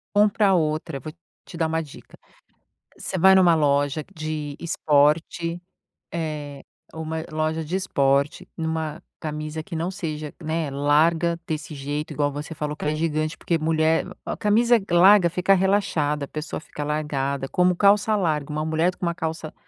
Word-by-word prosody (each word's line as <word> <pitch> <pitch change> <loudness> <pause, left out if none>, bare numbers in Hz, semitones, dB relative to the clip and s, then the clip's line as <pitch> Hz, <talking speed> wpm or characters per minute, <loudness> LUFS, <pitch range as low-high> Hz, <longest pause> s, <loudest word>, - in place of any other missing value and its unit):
Compra 205 -1 +4
outra, 155 -3 0
vou 155 +4 -8 0.3
te 170 - -10
dar 165 -1 +1
uma 160 0 -1
dica: 150 -4 -13 0.8
você 190 - -4
vai 190 +2 +6
numa 180 -3 +6
loja 145 0 +1
de 155 -3 -4
esporte, 165 +2 +1 0.5
eh, 150 -4 -4 0.3
uma 160 0 -4
loja 155 +1 -1
de 160 +4 -3
esporte, 140 -6 +1
numa 160 -1 -3 0.2
camisa 155 0 -4
que 160 - -8
não 165 +3 -2
seja, 155 -6 -5
né, 160 -2 -2
larga 160 +4 +2
desse 155 -1 -5
jeito 145 +2 -4
igual 145 -1 0
você 150 +3 -6
falou 150 -1 -3
que - - -7
é 150 +1 0
gigante 155 0 -1
porque 170 - -1
mulher, 160 0 +2 0.2
a - - -3
camisa 230 +3 +3
larga 180 +1 +6
fica 180 +3 +2
relaxada, 180 -7 +1
a - - -17
pessoa 155 0 -5
fica 150 -2 -7
largada, 140 -2 -2
como 180 +3 +2
calça 205 +3 +4
larga, 155 -7 -1
uma 155 +1 -2
mulher 160 +3 +1
com - - -4
uma 170 - 0
calça 160 -1 -5
160 Hz, 160 wpm, -24 LUFS, 150-170 Hz, 0.8 s, vai